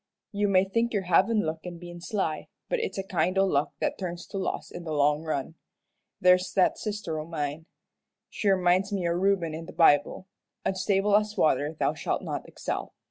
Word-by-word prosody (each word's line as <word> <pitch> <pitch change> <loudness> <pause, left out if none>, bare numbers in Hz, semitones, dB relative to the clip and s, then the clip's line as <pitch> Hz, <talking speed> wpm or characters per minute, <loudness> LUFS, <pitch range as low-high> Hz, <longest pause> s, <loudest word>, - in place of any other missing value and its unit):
You 205 0 0
may 190 -2 +4
think 230 +4 0
you're 200 -2 0
havin' 190 +5 +3
luck 160 +1 -2
in 175 -1 -7
bein' 175 0 -10
sly, 175 -5 -2 0.2
but - - 0
it's 455 - -3
a 195 - -1
kind 185 0 0
o' 195 - +5
luck 145 -6 0
that - - -1
turns 175 -2 -5
to 195 - -5
loss 190 - -3
in 175 - -7
the 160 - -5
long 150 +1 +2
run. 155 -1 -3 0.7
There's 180 0 +4
that 190 - +3
sister 205 -7 -3
o' 155 - -5
mine. 155 0 -4 0.6
She 205 - -1
reminds 185 +1 +3
me 190 -4 -1
o' - - +1
Reuben 180 -2 +1
in 165 +1 -6
the - - -9
Bible 160 +1 +3 0.4
'unstable 195 +1 +2
as 210 0 +1
water 155 -3 +2
thou - - +2
shalt - - -2
not - - -4
excel.' - - -5
180 Hz, 195 wpm, -27 LUFS, 165-195 Hz, 0.7 s, o